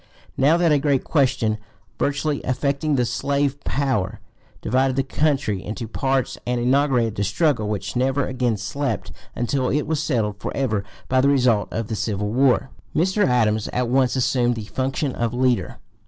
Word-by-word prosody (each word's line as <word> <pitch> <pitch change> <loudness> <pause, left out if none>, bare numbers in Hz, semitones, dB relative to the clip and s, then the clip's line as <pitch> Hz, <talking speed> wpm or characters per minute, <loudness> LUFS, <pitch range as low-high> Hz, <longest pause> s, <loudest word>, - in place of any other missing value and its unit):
Now 145 +5 +4
that 170 -2 +3
a 145 - +4
great 140 -2 +1
question, 125 -7 +1 0.4
vitally 145 +1 0
(p. - - -8
244) - - -6
affecting 140 +3 0
the 125 -2 +2
slave 140 +2 -1
power, 130 -9 -1 0.4
divided 130 +2 +1
the 135 - +1
country 135 -8 0
into 110 +2 -5
parties 135 +3 -1
and 125 0 0
inaugurated 125 -2 +2
the 100 - -1
struggle 110 - +1
which 105 +2 -3
never 130 +2 +1
again 125 -4 -1
slept 120 +8 -3 0.2
until 125 +2 0
it 150 +1 0
was 155 -1 -1
settled 110 -9 -1
forever 110 -7 -1 0.2
by 130 0 +3
the 140 - +4
result 125 -6 +3
of 115 -1 -3
the 110 - -3
civil 105 -1 -2
war, 130 +1 +2 0.2
Mr. 190 +5 +2
Adams 110 -4 +2
at 125 -1 -1
once 130 0 +2
assumed 125 -1 +1
the 110 -2 -6
function 130 +5 -2
of 120 0 -2
leader. 125 -1 +1
130 Hz, 170 wpm, -22 LUFS, 115-140 Hz, 0.4 s, Now